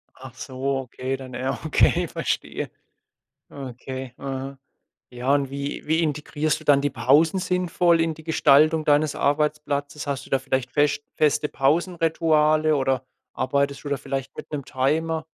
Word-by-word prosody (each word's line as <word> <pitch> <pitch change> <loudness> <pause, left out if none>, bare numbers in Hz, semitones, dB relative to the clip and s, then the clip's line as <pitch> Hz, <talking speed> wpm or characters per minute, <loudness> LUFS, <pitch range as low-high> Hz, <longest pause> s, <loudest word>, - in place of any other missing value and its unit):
Ach 130 -1 -11
so, 135 +1 -3
okay, 130 +1 -4
dann 130 -2 -10
ja, 130 +1 -2
okay, 155 - +3
verstehe. - - -3 0.8
Okay. 130 -1 -7
Mhm. 135 0 -5 0.5
Ja 125 +2 -1
und 140 -2 0
wie 140 +1 -5
wie 160 +2 +2
integrierst 150 +1 -1
du - - -13
dann 140 -1 +5
die 145 0 0
Pausen 155 +7 +3
sinnvoll 180 -2 +2
in 165 -1 0
die 160 0 -14
Gestaltung 155 0 +4
deines 150 0 +3
Arbeitsplatzes? 145 0 -1
Hast 140 -1 -3
du - - -17
da 135 - +3
vielleicht 130 -1 -2
fescht 145 0 +1
feste 150 0 +2
Pausenrituale 155 0 +2
oder 130 -1 0 0.3
arbeitest 140 +2 -1
du - - -4
da 140 - 0
vielleicht 135 -1 -5
mit - - -9
'nem 140 -3 -3
Timer? 155 +4 0
145 Hz, 150 wpm, -24 LUFS, 135-155 Hz, 0.8 s, dann